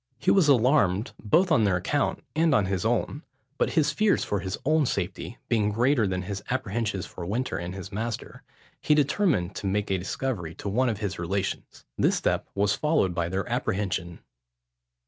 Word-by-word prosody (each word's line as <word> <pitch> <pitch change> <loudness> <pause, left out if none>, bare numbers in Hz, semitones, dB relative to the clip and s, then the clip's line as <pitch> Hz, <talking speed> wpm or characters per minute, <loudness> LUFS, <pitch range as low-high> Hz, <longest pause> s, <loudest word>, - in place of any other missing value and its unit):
He - - +2
was 190 -6 +4
alarmed, 120 -6 +3
both 165 - +3
on 125 -8 +4
their 100 -3 +3
account, 90 - -1
and 160 -2 +3
on 105 - +3
his 95 +1 -2
own; 120 +5 0 0.4
but - - +1
his 155 -4 +3
fears 215 -1 +2
for 105 - -1
his 95 +2 -4
own 155 -1 +3
safety 100 +5 -3
being 110 -3 +2
greater 120 +1 +2
than 95 0 -2
his 100 +1 -5
apprehensions 110 -5 -2
for 90 - -9
Winter 115 +9 -2
and 85 +2 -5
his 95 +1 -8
master, 110 +3 -5 0.4
he 150 - +3
determined 140 - +1
to 100 - -3
make 100 +1 -1
a 95 - +1
discovery 90 -4 -3
to 100 - -5
one 125 +5 +2
of 110 - -2
his 100 -3 -3
relations. 95 +3 -3
This - - +3
step - - -1
was 100 0 +2
followed 150 - +1
by 85 -1 -1
their 95 0 -2
apprehension. 95 -3 -2
105 Hz, 185 wpm, -26 LUFS, 95-130 Hz, 0.4 s, was